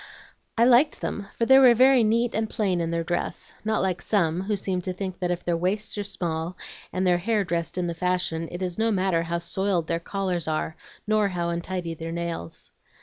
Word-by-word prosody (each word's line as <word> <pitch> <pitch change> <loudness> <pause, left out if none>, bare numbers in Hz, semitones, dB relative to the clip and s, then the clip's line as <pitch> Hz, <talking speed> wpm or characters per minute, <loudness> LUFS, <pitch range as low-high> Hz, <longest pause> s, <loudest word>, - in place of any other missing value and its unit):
I 230 - +5
liked 255 +5 +4
them, 200 -1 -4
for 230 - +2
they 265 +2 +7
were 250 -3 +7
very 255 0 +6
neat 230 +2 +2
and 220 0 -1
plain 190 -6 0
in 165 - -1
their 170 0 -1
dress, 175 +1 -3
not 220 -1 0
like 185 -2 -1
some, 175 -4 +1
who 205 +2 -1
seem 190 -2 -2
to 185 +1 -3
think 185 0 -5
that 180 -1 -1
if 175 0 -2
their 175 - +1
waists 190 +5 -1
are - - -1
small, 175 -3 -3 0.3
and 185 +1 -1
their 175 -1 +3
hair 210 +2 +1
dressed 170 -1 -2
in 180 - 0
the 170 - -2
fashion, 170 -2 -1
it 175 +2 -4
is 180 +2 -3
no 225 +1 +2
matter 190 -5 +1
how 170 +1 -2
soiled 175 0 -1
their 165 0 -1
collars 180 -2 -2
are, 155 0 -2 0.3
nor 215 -1 +2
how 175 -3 -2
untidy 170 0 -3
their 165 +1 -6
nails. 170 - -5
185 Hz, 215 wpm, -25 LUFS, 170-210 Hz, 0.3 s, they